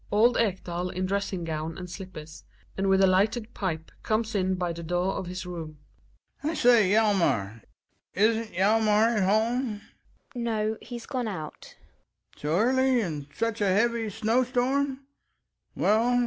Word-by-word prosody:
Old 230 +4 +4
Ekdal 180 -4 -1
in 185 +1 -3
dressing 195 -2 -2
gown 160 0 -4
and 180 - -7
slippers, 165 -4 -9 0.3
and 195 0 0
with 195 0 +4
a - - +8
lighted 215 +5 +1
pipe 160 -5 -4
comes 220 0 -1
in 190 -2 +1
by 180 -2 -2
the 170 - -7
door 175 +3 -1
of 185 - -4
his 185 +1 -5
room. 165 -4 -7 0.6
Ekdal. 295 - -2
I - - -2
say, 235 -8 +5
Hjalmar 175 - +2 0.5
Isn't 220 +2 +2
Hjalmar 215 +4 +3
at - - +2
home? 220 +2 +1 0.5
Gina. 245 -2 -4
No, 220 -1 -1
he's 240 -2 -8
gone 250 -4 -3
out 160 -8 -7 0.6
Ekdal. - - -20
So 150 - -3
early? 255 +8 +3
And 155 -8 -4
in 145 - -26
such 230 -1 -2
a 205 - +3
heavy 225 +3 +1
snow 225 +5 +1
storm 265 +2 -1
205 Hz, 160 wpm, -27 LUFS, 180-230 Hz, 0.6 s, a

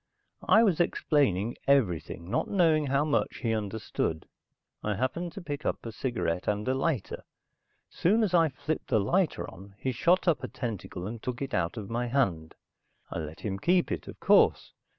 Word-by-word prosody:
I 220 - +7
was 190 -7 +2
explaining 130 - +1
everything, 90 - +1
not - - 0
knowing 160 -6 +3
how 140 +2 +2
much 150 - 0
he 115 -2 +1
understood. 105 -6 -2 0.6
I 105 -1 0
happened 150 - -2
to 195 - -8
pick 145 -1 -5
up - - -2
a 115 - -4
cigarette 110 -8 -2
and 105 +1 -1
a 130 - +2
lighter. 135 - -2 0.6
Soon 215 +6 +2
as 195 -4 0
I 165 -2 +5
flipped 150 +3 -4
the 110 - +3
lighter 175 - +1
on, 100 +2 -13
he 130 +5 -2
shot 175 +10 +2
up 165 -4 +2
a - - -2
tentacle 100 -7 -5
and 110 +2 -6
took 125 +1 -4
it 135 -1 -4
out 85 -1 0
of 105 0 -6
my 120 +1 -1
hand. 95 -12 0 0.6
I - - -3
let 80 +1 -7
him 100 -2 -3
keep 175 - +2
it, - - -3
of - - -9
course. - - +4
125 Hz, 185 wpm, -29 LUFS, 100-155 Hz, 0.6 s, I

